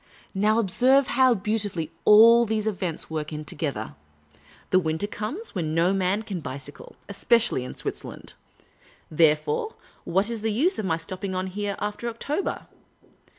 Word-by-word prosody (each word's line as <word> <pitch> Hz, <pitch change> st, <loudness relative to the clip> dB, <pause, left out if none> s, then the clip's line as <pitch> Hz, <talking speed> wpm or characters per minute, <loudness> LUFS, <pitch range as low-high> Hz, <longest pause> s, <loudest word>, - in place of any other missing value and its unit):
Now, 210 Hz, +3 st, +2 dB
observe 250 Hz, +6 st, +3 dB
how 255 Hz, -1 st, +4 dB
beautifully 200 Hz, -6 st, -2 dB
all 230 Hz, +3 st, +8 dB
these 215 Hz, 0 st, -1 dB
events 185 Hz, -6 st, -2 dB
work 155 Hz, -1 st, -3 dB
in 150 Hz, 0 st, -6 dB
together! 140 Hz, -, -4 dB, 0.8 s
The 185 Hz, -, +5 dB
winter 160 Hz, +2 st, -1 dB
comes, 220 Hz, -, -5 dB
when 160 Hz, -4 st, -2 dB
no 170 Hz, +3 st, +3 dB
man 195 Hz, +2 st, 0 dB
can 200 Hz, -4 st, -5 dB
bicycle, 140 Hz, 0 st, -9 dB
especially 230 Hz, -, +1 dB
in 125 Hz, -, -8 dB
Switzerland. -, -, -6 dB, 0.8 s
Therefore, 155 Hz, -, +2 dB, 0.3 s
what 190 Hz, +4 st, +1 dB
is 230 Hz, -2 st, -4 dB
the 220 Hz, 0 st, 0 dB
use 320 Hz, -, +1 dB
of 215 Hz, -, -2 dB
my 165 Hz, -3 st, 0 dB
stopping 185 Hz, +3 st, -5 dB
on 185 Hz, 0 st, -1 dB
here 200 Hz, +1 st, -3 dB
after 210 Hz, +3 st, -3 dB
October? 285 Hz, +10 st, -3 dB
200 Hz, 150 wpm, -25 LUFS, 165-225 Hz, 0.8 s, all